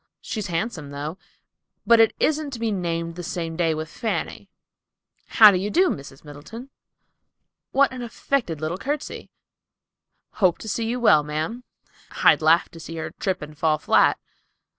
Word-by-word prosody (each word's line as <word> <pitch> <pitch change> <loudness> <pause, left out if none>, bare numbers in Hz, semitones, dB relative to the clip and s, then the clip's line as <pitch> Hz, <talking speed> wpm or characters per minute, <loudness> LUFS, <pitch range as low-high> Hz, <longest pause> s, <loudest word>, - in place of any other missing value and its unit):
She's 215 -3 -5
handsome, 165 -4 -3
though, 145 +5 -6 0.7
but 235 -1 +6
it 225 - +4
isn't 305 -1 +1
to 235 - -6
be 225 -1 -1
named 170 -3 -2
the 180 - -6
same 165 -2 -4
day 165 -2 +1
with 155 +1 -4
Fanny,"—"How 220 +1 0
do 185 - +1
you 200 +3 -2
do, 360 - +3
Miss 140 -1 -8
Middleton?"—"What 230 - -5
an 255 -1 -7
affected 235 - -2
little 165 +4 -3
courtesy!"—"Hope 240 - -5
to - - -10
see 225 +2 -2
you 245 +2 -2
well, 185 -11 +5
ma'am."—"I'd 155 +12 -1
laugh 160 +2 +4
to 165 - -13
see 165 +1 -8
her 160 -1 -5
trip 185 -4 -2
and 150 0 -10
fall 155 0 +1
flat." - - +3
180 Hz, 145 wpm, -23 LUFS, 155-230 Hz, 0.7 s, but